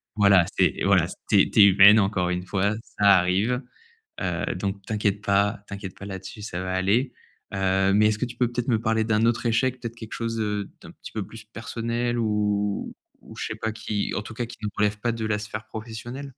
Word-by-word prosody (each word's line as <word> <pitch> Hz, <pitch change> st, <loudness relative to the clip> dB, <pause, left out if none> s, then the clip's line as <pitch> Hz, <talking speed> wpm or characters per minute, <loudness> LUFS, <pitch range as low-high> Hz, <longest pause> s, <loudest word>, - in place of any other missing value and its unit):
Voilà 100 Hz, -4 st, +5 dB
c'est -, -, +3 dB
voilà -, -, +4 dB, 0.2 s
c'est -, -, +5 dB
tu -, -, +2 dB
es -, -, +10 dB
humaine 100 Hz, +2 st, +8 dB
encore 95 Hz, -3 st, +1 dB
une 90 Hz, 0 st, -2 dB
fois, 100 Hz, +2 st, 0 dB, 0.2 s
ça 100 Hz, -2 st, +7 dB
arrive. 100 Hz, +9 st, +1 dB, 0.6 s
Heu, -, -, -2 dB
donc 100 Hz, 0 st, -3 dB
t'inquiète 105 Hz, -2 st, 0 dB
pas, 100 Hz, 0 st, +1 dB
t'inquiète 100 Hz, -2 st, -7 dB
pas 100 Hz, -, -8 dB
là-dessus 95 Hz, +2 st, -8 dB
ça 90 Hz, -4 st, -5 dB
va 95 Hz, -, -3 dB
aller. 100 Hz, +8 st, +1 dB, 0.4 s
Heu, 95 Hz, 0 st, +2 dB
mais 105 Hz, +1 st, +4 dB
est-ce 110 Hz, 0 st, 0 dB
que -, -, 0 dB
tu 120 Hz, -1 st, -8 dB
peux 125 Hz, -2 st, +2 dB
peut-être 120 Hz, +1 st, -3 dB
me 110 Hz, -3 st, +2 dB
parler 110 Hz, 0 st, +1 dB
d'un 110 Hz, 0 st, +2 dB
autre 120 Hz, +1 st, 0 dB
échec? 130 Hz, +3 st, +1 dB
Peut-être 115 Hz, -1 st, -6 dB
quelque 110 Hz, -1 st, -8 dB
chose, 115 Hz, -1 st, -3 dB
heu, 105 Hz, -2 st, -2 dB
d'un -, -, -12 dB
petit -, -, -12 dB
peu 110 Hz, -3 st, -3 dB
plus 110 Hz, -1 st, -12 dB
personnel 115 Hz, +2 st, -3 dB
ou? 105 Hz, -2 st, -1 dB, 0.4 s
Je -, -, -4 dB
sais 110 Hz, -, -5 dB
pas 110 Hz, 0 st, -1 dB
qui, 105 Hz, -2 st, -3 dB
en 105 Hz, -, -2 dB
tout 110 Hz, -, -10 dB
cas 120 Hz, 0 st, -3 dB
qui 120 Hz, -, -11 dB
ne 105 Hz, -, -1 dB
relève 105 Hz, 0 st, +1 dB
pas 120 Hz, +2 st, 0 dB
de 115 Hz, -1 st, -4 dB
la 105 Hz, -1 st, 0 dB
sphère 110 Hz, +1 st, -6 dB
professionnelle? 115 Hz, +5 st, -7 dB
105 Hz, 215 wpm, -25 LUFS, 100-115 Hz, 0.6 s, es